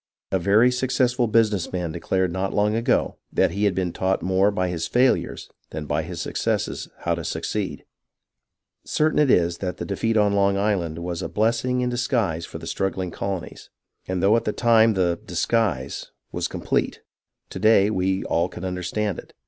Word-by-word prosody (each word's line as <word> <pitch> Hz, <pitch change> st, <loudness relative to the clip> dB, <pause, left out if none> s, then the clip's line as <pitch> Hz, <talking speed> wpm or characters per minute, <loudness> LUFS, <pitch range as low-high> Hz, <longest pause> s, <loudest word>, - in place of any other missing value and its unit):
A 95 Hz, -, +2 dB
very 105 Hz, +8 st, +4 dB
successful 125 Hz, -1 st, +1 dB
business 110 Hz, -5 st, +2 dB
man 90 Hz, -3 st, -2 dB
declared 95 Hz, +3 st, -1 dB
not 95 Hz, +1 st, -2 dB
long 105 Hz, +1 st, +2 dB
ago 115 Hz, +3 st, +1 dB
that -, -, +2 dB
he 100 Hz, +1 st, 0 dB
had 100 Hz, -3 st, +2 dB
been 90 Hz, -2 st, -1 dB
taught 95 Hz, 0 st, 0 dB
more 95 Hz, +2 st, +3 dB
by 90 Hz, -3 st, -1 dB
his 85 Hz, -2 st, -2 dB
failures 125 Hz, +1 st, +1 dB, 0.2 s
than 75 Hz, -, -5 dB
by -, -, 0 dB
his -, -, -7 dB
successes -, -, -2 dB
how 85 Hz, -, 0 dB
to 85 Hz, 0 st, -4 dB
succeed. -, -, -3 dB, 1.0 s
Certain 155 Hz, 0 st, +1 dB
it 150 Hz, -2 st, +4 dB
is 85 Hz, -5 st, +3 dB
that 90 Hz, -1 st, -3 dB
the -, -, -4 dB
defeat 110 Hz, +3 st, 0 dB
on 105 Hz, -1 st, +3 dB
Long 100 Hz, 0 st, +2 dB
Island 95 Hz, -6 st, 0 dB
was 85 Hz, 0 st, -4 dB
a -, -, -4 dB
blessing 115 Hz, +4 st, +1 dB
in 125 Hz, 0 st, 0 dB
disguise 110 Hz, -, -1 dB
for -, -, -7 dB
the 80 Hz, -, -9 dB
strug 95 Hz, +3 st, -1 dB
gling 90 Hz, -2 st, -4 dB
colonies, 95 Hz, -4 st, -5 dB, 0.4 s
and 95 Hz, -1 st, -2 dB
though 100 Hz, +3 st, +5 dB
at 115 Hz, 0 st, 0 dB
the 105 Hz, -, 0 dB
time 115 Hz, -2 st, +4 dB
the 85 Hz, -2 st, +1 dB
" -, -, -24 dB
disguise 90 Hz, -, -1 dB
" -, -, -52 dB
was -, -, -2 dB
complete, -, -, -2 dB, 0.5 s
to -, -, -5 dB
day 110 Hz, -1 st, +5 dB
we 95 Hz, -1 st, 0 dB
all 85 Hz, +2 st, 0 dB
can 90 Hz, -, -7 dB
understand 90 Hz, +2 st, -2 dB
it. -, -, -14 dB
100 Hz, 190 wpm, -23 LUFS, 90-115 Hz, 1.0 s, though